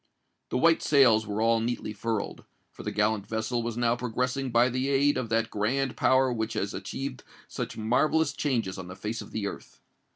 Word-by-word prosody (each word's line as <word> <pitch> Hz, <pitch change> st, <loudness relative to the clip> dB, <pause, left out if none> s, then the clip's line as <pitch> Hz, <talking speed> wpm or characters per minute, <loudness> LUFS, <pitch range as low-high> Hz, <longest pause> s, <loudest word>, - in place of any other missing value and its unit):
The -, -, -1 dB
white 165 Hz, +5 st, +4 dB
sails 120 Hz, -7 st, +4 dB
were 105 Hz, +1 st, -1 dB
all 115 Hz, 0 st, +3 dB
neatly 115 Hz, -2 st, -3 dB
furled; 110 Hz, +1 st, -3 dB, 0.3 s
for -, -, -11 dB
the -, -, -3 dB
gallant 105 Hz, -1 st, 0 dB
vessel 110 Hz, +2 st, -1 dB
was 115 Hz, 0 st, -4 dB
now 120 Hz, -1 st, +2 dB
progressing 125 Hz, +2 st, -2 dB
by 120 Hz, +1 st, +4 dB
the 130 Hz, +2 st, -1 dB
aid 140 Hz, +1 st, +3 dB
of 120 Hz, -3 st, -2 dB
that 115 Hz, 0 st, 0 dB
grand 125 Hz, +6 st, 0 dB
power 130 Hz, -1 st, +3 dB
which 110 Hz, -1 st, -2 dB
has 100 Hz, -, -2 dB
achieved 135 Hz, -2 st, -5 dB, 0.2 s
such -, -, -5 dB
marvellous 145 Hz, +7 st, +2 dB
changes 115 Hz, -11 st, -1 dB
on 90 Hz, -, -7 dB
the 90 Hz, -, -8 dB
face 105 Hz, +4 st, -4 dB
of -, -, -10 dB
the 110 Hz, -2 st, -3 dB
earth. -, -, -7 dB
115 Hz, 195 wpm, -28 LUFS, 110-130 Hz, 0.3 s, white